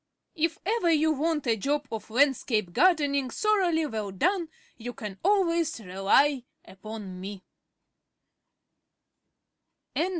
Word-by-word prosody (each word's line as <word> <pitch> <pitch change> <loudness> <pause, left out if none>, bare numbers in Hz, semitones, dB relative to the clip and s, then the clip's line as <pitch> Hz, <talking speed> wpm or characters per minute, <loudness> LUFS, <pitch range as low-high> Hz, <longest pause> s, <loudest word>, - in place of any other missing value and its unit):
If 330 +1 0
ever 425 -3 +1
you 315 0 +3
want 310 0 -1
a 230 -2 +2
job 285 +7 -1
of 220 -1 -6
landscape 230 -6 +1
gardening 285 - +3
thoroughly 365 - +1
well 220 -7 -4
done, 335 - 0 0.3
you 245 +1 -7
can 205 -4 -8
always 340 -7 +2
rely 210 +8 +2 0.2
upon 195 -1 -9
me. 195 0 -7
280 Hz, 105 wpm, -27 LUFS, 215-330 Hz, 0.3 s, you